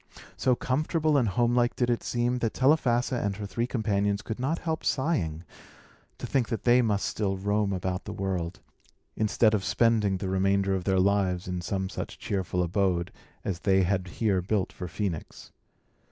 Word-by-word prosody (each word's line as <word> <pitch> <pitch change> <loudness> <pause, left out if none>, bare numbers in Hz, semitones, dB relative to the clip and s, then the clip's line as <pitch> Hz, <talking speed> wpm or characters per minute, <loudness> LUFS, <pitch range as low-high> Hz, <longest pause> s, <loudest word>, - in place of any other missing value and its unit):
So 125 - +2
comfortable 155 +5 0
and 130 -5 +3
homelike 120 +4 +2
did 120 -1 +1
it 120 - 0
seem, 120 +1 0
that 115 -2 -1
Telephassa 130 -3 +2
and 100 -1 -1
her 105 +1 -6
three 110 +5 -2
companions 105 -4 0
could 110 +1 -5
not 140 +6 0
help 160 -2 -3
sighing, 90 - 0 0.7
to - - -6
think 130 -4 0
that 115 - -3
they 125 +1 +5
must 105 -4 0
still 95 -3 -1
roam 100 +1 0
about 90 0 -3
the - - -5
world, 95 - -3 0.5
instead 110 +1 +2
of 105 -3 +1
spending 110 -4 +2
the 95 - -4
remainder 95 +1 +1
of 95 -2 -2
their 95 -1 +2
lives 95 -2 +1
in 90 -1 -3
some 95 +2 -2
such - - -6
cheerful 95 -2 -1
abode 90 -1 0 0.3
as 90 -3 -2
they 95 -1 +3
had 95 0 0
here 95 0 0
built 95 +1 -1
for 90 - -6
Phœnix. 90 -4 -5
100 Hz, 175 wpm, -27 LUFS, 95-120 Hz, 0.7 s, they